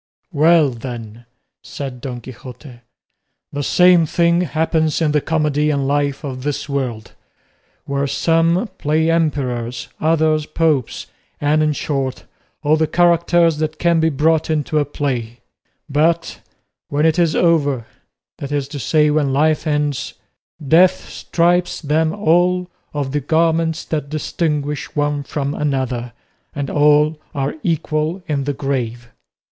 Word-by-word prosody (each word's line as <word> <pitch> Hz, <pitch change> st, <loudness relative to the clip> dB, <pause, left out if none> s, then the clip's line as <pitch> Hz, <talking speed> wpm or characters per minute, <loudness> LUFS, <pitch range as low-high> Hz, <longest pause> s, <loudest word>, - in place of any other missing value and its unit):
"Well 155 Hz, 0 st, +4 dB
then," 115 Hz, -1 st, -8 dB, 0.3 s
said 130 Hz, -3 st, -7 dB
Don 125 Hz, -3 st, -6 dB
Quixote, 125 Hz, +1 st, -11 dB, 0.7 s
"the 145 Hz, -, -2 dB
same 180 Hz, +2 st, +4 dB
thing 170 Hz, +2 st, +2 dB
happens 160 Hz, -1 st, 0 dB
in 160 Hz, -3 st, +1 dB
the 150 Hz, 0 st, +2 dB
comedy 150 Hz, -1 st, 0 dB
and 140 Hz, -2 st, 0 dB
life 145 Hz, 0 st, 0 dB
of 130 Hz, -3 st, -5 dB
this 145 Hz, +1 st, -3 dB
world, 125 Hz, -6 st, -3 dB, 0.7 s
where 140 Hz, 0 st, -1 dB
some 165 Hz, -, +1 dB
play 160 Hz, +2 st, +1 dB
emperors, 130 Hz, -7 st, -1 dB
others 155 Hz, -1 st, +1 dB
popes, 155 Hz, -6 st, 0 dB, 0.3 s
and, 150 Hz, +1 st, +2 dB
in 155 Hz, -1 st, +2 dB
short, 135 Hz, -3 st, -3 dB, 0.4 s
all 155 Hz, +1 st, +3 dB
the 160 Hz, 0 st, +1 dB
characters 170 Hz, -1 st, +3 dB
that 155 Hz, 0 st, -2 dB
can 170 Hz, 0 st, +2 dB
be 160 Hz, 0 st, +3 dB
brought 160 Hz, +2 st, +1 dB
into 155 Hz, 0 st, 0 dB
a 145 Hz, -, +1 dB
play; 125 Hz, -5 st, -3 dB, 0.5 s
but 160 Hz, +3 st, 0 dB, 0.5 s
when 145 Hz, +2 st, 0 dB
it 160 Hz, +2 st, +2 dB
is 165 Hz, -3 st, +2 dB
over, 145 Hz, -8 st, +2 dB, 0.5 s
that 140 Hz, -, -6 dB
is 145 Hz, -2 st, -1 dB
to 145 Hz, -, -6 dB
say 150 Hz, +4 st, +2 dB
when 150 Hz, -2 st, +1 dB
life 155 Hz, +3 st, +1 dB
ends, 150 Hz, -2 st, -1 dB, 0.5 s
death 175 Hz, +5 st, +4 dB
strips 175 Hz, +1 st, 0 dB
them 155 Hz, +1 st, +1 dB
all 180 Hz, -1 st, +1 dB, 0.2 s
of 145 Hz, -3 st, -3 dB
the 145 Hz, +1 st, -1 dB
garments 160 Hz, +2 st, +1 dB
that 150 Hz, -3 st, -3 dB
distinguish 150 Hz, -1 st, -2 dB
one 145 Hz, -1 st, 0 dB
from 140 Hz, 0 st, -3 dB
the 145 Hz, -2 st, -1 dB
other, 125 Hz, -2 st, -3 dB, 0.4 s
and 140 Hz, -2 st, -3 dB
all 150 Hz, +1 st, +3 dB, 0.2 s
are 140 Hz, 0 st, -1 dB
equal 160 Hz, +2 st, -1 dB
in 140 Hz, -3 st, -1 dB
the 145 Hz, -, -1 dB
grave." 125 Hz, -4 st, -3 dB
150 Hz, 140 wpm, -19 LUFS, 140-160 Hz, 0.7 s, Well